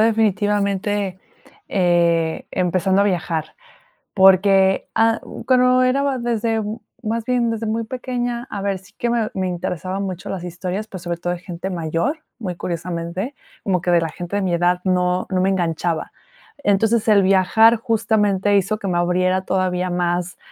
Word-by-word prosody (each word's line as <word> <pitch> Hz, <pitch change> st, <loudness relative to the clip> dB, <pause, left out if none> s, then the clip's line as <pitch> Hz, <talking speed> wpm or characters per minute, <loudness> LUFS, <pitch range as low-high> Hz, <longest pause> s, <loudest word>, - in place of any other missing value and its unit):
definitivamente, 205 Hz, -3 st, +1 dB, 0.5 s
eh, 170 Hz, -3 st, +1 dB
empezando 185 Hz, +2 st, +1 dB
a -, -, +2 dB
viajar. 170 Hz, -5 st, -2 dB, 0.6 s
Porque, 190 Hz, 0 st, +5 dB
ah, 225 Hz, 0 st, +3 dB, 0.3 s
cuando 255 Hz, 0 st, +4 dB
era 255 Hz, +2 st, +2 dB
más 265 Hz, -3 st, -1 dB
desde, 225 Hz, -1 st, 0 dB, 0.4 s
más 225 Hz, 0 st, -2 dB
bien 245 Hz, -1 st, +1 dB
desde 225 Hz, 0 st, -3 dB
muy 225 Hz, +1 st, -1 dB
pequeña, 245 Hz, 0 st, -4 dB
a 200 Hz, -, -5 dB
ver, 200 Hz, -1 st, -1 dB
sí 185 Hz, -, -21 dB
que 240 Hz, -, -1 dB
me 235 Hz, -2 st, 0 dB
me 190 Hz, -1 st, -1 dB
interesaban 185 Hz, +2 st, -3 dB
mucho 185 Hz, -2 st, -5 dB
las 185 Hz, -3 st, -4 dB
historias, 180 Hz, +4 st, -4 dB
pero 190 Hz, -, -8 dB
sobre 175 Hz, 0 st, -4 dB
todo 175 Hz, +1 st, -2 dB
de 175 Hz, -, -6 dB
gente 180 Hz, +1 st, -6 dB
mayor, 170 Hz, -, -2 dB, 0.2 s
muy 185 Hz, -6 st, -4 dB
curiosamente, 170 Hz, -, -4 dB, 0.3 s
como 185 Hz, -3 st, 0 dB
que 175 Hz, -, 0 dB
de 170 Hz, -, +5 dB
la 165 Hz, -, -1 dB
gente 175 Hz, +4 st, -6 dB
de 205 Hz, -, 0 dB
mi 185 Hz, -2 st, 0 dB
edad 175 Hz, +1 st, +2 dB
no 180 Hz, 0 st, +1 dB
no 185 Hz, -1 st, +1 dB
me 190 Hz, -, +2 dB
enganchaba. 170 Hz, -3 st, -1 dB, 0.5 s
Entonces 215 Hz, +3 st, +2 dB
el 205 Hz, -2 st, +5 dB
viajar 195 Hz, +4 st, +5 dB
justamente 210 Hz, -3 st, +1 dB
hizo 200 Hz, +2 st, +1 dB
que 200 Hz, -, -4 dB
me 175 Hz, -2 st, 0 dB
abriera 185 Hz, +1 st, +1 dB
todavía 185 Hz, -1 st, -1 dB
más 175 Hz, 0 st, -1 dB
190 Hz, 165 wpm, -20 LUFS, 180-220 Hz, 0.6 s, Porque